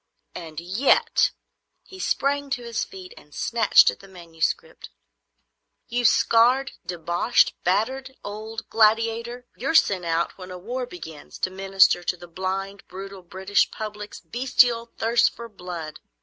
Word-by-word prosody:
And 160 -3 -7
yet,"—he 230 - -1
sprang 285 -4 0
to 260 -3 -2
his 235 -2 -2
feet 185 -1 -10
and 150 - -16
snatched 230 -3 +5
at - - -13
the 195 - -14
manuscript,—"you 190 - -6
scarred, 245 +5 +4
deboshed, 175 +5 +1
battered 260 +8 0
old 215 +2 -7
gladiator! 230 +2 +2
you're 275 +6 -2
sent 190 - +4
out 170 +3 -1
when 185 0 -9
a 180 - -7
war 245 +7 -4
begins, 160 -7 -10
to 185 - 0
minister 190 -1 +3
to 180 - -2
the 175 0 -12
blind, 190 +3 -4
brutal, 195 +1 -9
British 190 +3 0
public's 210 -1 -7
bestial 245 -2 +2
thirst 230 +1 +2
for 235 0 -8
blood. 175 -7 -8
205 Hz, 130 wpm, -24 LUFS, 180-240 Hz, -, snatched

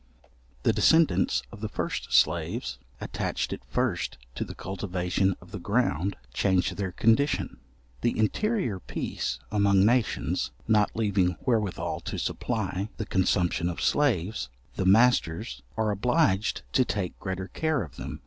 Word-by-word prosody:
The - - +3
descendants 95 - +4
of 105 - -11
the 110 - -3
first - - -3
slaves, 65 -1 +2 0.2
attached - - -2
at - - -7
first - - -1 0.2
to - - -3
the - - -8
cultivation 95 -1 -1
of 90 - -16
the 105 - -5
ground, 100 - 0 0.2
change 95 +5 +2
their 100 -2 -3
condition. 115 - +2 0.4
The 120 - +1
interior 120 - 0
peace - - -3
among 100 -2 +4
nations, 120 - +1 0.2
not 105 -2 +4
leaving 100 -5 +1
wherewithal 110 -6 0
to - - -5
supply 100 -3 -2
the 110 - -3
consumption 90 -2 +1
of 85 - -5
slaves, 110 - +1 0.3
the 95 - 0
masters 95 - +3 0.2
are 110 -1 +1
obliged 110 - +1
to 130 - +5
take 100 -7 -3
greater 95 -1 -4
care 155 -6 0
of 70 -4 -11
them. - - -6
100 Hz, 140 wpm, -27 LUFS, 90-115 Hz, 0.4 s, to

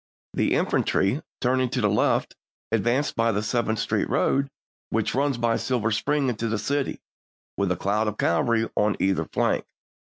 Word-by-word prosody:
The - - +1
infantry, 100 +11 +1 0.2
turning 130 0 +2
to 125 - -2
the 105 - +3
left, 105 +1 +1 0.4
advanced 120 +6 +1
by 115 0 +2
the 105 0 -1
Seventh 110 0 0
Street - - -1
road, 140 0 +1 0.4
which - - 0
runs 140 -1 +1
by 115 -1 +1
Silver 115 -4 0
Spring 140 +5 +1
into 115 -2 -1
the 110 0 0
city, 140 +6 -2 0.5
with 100 -2 0
a 90 - 0
cloud 105 +4 0
of 105 0 -3
cavalry 115 +7 +2
on 105 0 +2
either 95 0 +1
flank. - - 0
115 Hz, 165 wpm, -25 LUFS, 105-130 Hz, 0.5 s, the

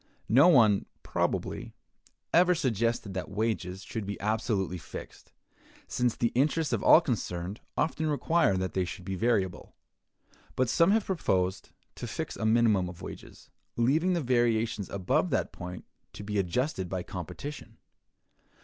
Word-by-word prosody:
No 130 - +7
one, 110 - +5 0.2
probably, - - -2 0.6
ever 180 +1 +5
suggested 115 - -1
that 95 - -4
wages 100 -4 -2
should 110 0 -5
be 100 - -4
absolutely 100 -4 -1
fixed, - - -10 0.6
since 125 -2 0
the 120 - +1
interests 150 +5 +1
of - - 0
all 165 - +7
concerned 100 - -3 0.2
often 160 -1 0
require 150 - +2
that 95 0 -2
they 95 - +1
should 90 +1 -7
be 95 - -3
variable; 95 -3 -1 0.8
but 130 -2 +1
some 165 +7 +4
have 215 +1 +3
proposed 95 - -1 0.2
to - - -7
fix - - -4
a 110 - -1
minimum 110 -5 +3
of 90 - -11
wages, - - -10 0.3
leaving 155 +10 +2
the 170 - 0
variations 115 -5 +1
above 95 -2 0
that - - 0
point 90 0 -8 0.3
to - - -8
be 105 0 -1
adjusted 95 - -1
by 90 -1 -3
competition. 110 - -7
110 Hz, 145 wpm, -29 LUFS, 95-130 Hz, 0.8 s, No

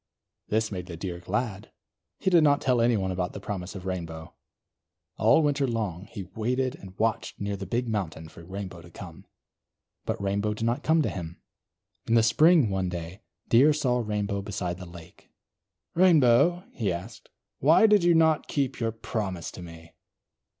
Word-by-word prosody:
This 110 +1 0
made 90 -2 -5
the 85 -3 -7
Deer 85 0 -5
glad. 105 +2 -3 0.5
He 190 - 0
did 170 -3 +6
not 145 -1 +4
tell 125 -3 +2
anyone 110 -6 +2
about 90 -1 -2
the - - -6
promise 95 -1 -6
of 95 -1 -8
Rainbow. 80 -3 -5 0.8
All 160 - +4
winter 145 -2 +1
long, 105 -6 -3
he 105 -3 -7
waited 125 +7 -2
and 95 -1 -13
watched 115 0 -1
near 100 0 -2
the 95 -1 -7
big 120 +5 -1
mountain 95 -7 -3
for 85 - -14
Rainbow 95 -1 -7
to 85 - -14
come; 85 -2 -11 0.8
but - - -2
Rainbow 100 +2 -1
did 115 - -3
not 120 +4 0
come 160 +1 +3
to - - 0
him. 85 -3 -7 0.7
In 115 - +2
the 115 - +5
spring, 145 - +5
one 95 -1 -1
day, 90 +3 -7 0.3
Deer 135 +6 +5
saw 125 -4 +1
Rainbow 105 -3 -2
beside 95 -3 -4
the 90 - -8
lake. 85 -1 -14 0.6
"Rainbow," 170 -1 +4
he 105 -6 -1
asked, 95 +6 -7 0.3
"why 160 - +5
did 210 -4 +5
you 175 -1 +5
not 160 -1 +3
keep 135 -2 -1
your 115 -1 0
promise 105 -5 -4
to - - -10
me?" 85 -1 -12
105 Hz, 175 wpm, -27 LUFS, 90-125 Hz, 0.8 s, did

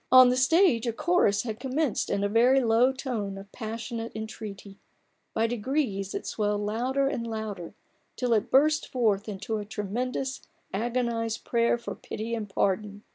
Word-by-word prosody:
On 255 -1 +9
the 250 - +2
stage 260 - +4
a 230 - 0
chorus 230 - +2
had 220 -3 -5
commenced 270 +1 -1
in 200 - 0
a - - +3
very 240 +6 +5
low 235 +3 +4
tone 230 -7 -4
of 195 0 -11
passionate 225 0 -5
entreaty; 210 -2 -7 0.6
by 225 - +2
degrees 230 -4 -1
it - - -4
swelled 210 -1 -1
louder 245 +6 0
and 235 -4 -2
louder, 215 -5 -5 0.4
till 245 -2 +1
it 215 - +1
burst 300 +3 +4
forth 215 -5 +1
into 210 +2 -3
a 210 - -3
tremendous 245 +6 -3 0.3
agonized 230 +1 -1
prayer 235 0 +2
for 235 - -6
pity 225 +2 -6
and 220 -3 -3
pardon. 205 +2 -1
230 Hz, 160 wpm, -27 LUFS, 210-250 Hz, 0.6 s, On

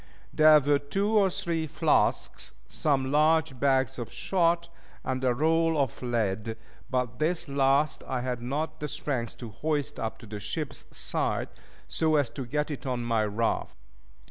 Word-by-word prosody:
There 155 0 +7
were 145 0 +2
two 195 +9 -1
or 205 -3 +4
three 165 -3 -2
flasks, 155 +1 +1
some 135 -3 0
large 155 -2 +3
bags 135 -1 +2
of 120 - -5
shot, 170 -2 +1 0.4
and 130 0 -2
a 130 - +3
roll 160 +4 +2
of 135 -5 -1
lead; 110 -2 -1 0.3
but 125 -2 -1
this 165 +2 +1
last 140 +1 +2
I 130 -2 -1
had 125 -1 -3
not 155 +5 -3
the 150 - -3
strength 130 -5 -3
to 120 - -7
hoist 145 +4 -2
up 110 -1 -3
to - - -13
the 105 -1 -7
ship's 135 +9 -4
side, - - -1 0.4
so 160 -1 +1
as 145 -6 +2
to 130 -4 -6
get 150 +4 -1
it 140 -1 -5
on 125 -2 -1
my 115 -2 +1
raft. 105 +2 -1
140 Hz, 165 wpm, -28 LUFS, 125-155 Hz, 0.4 s, There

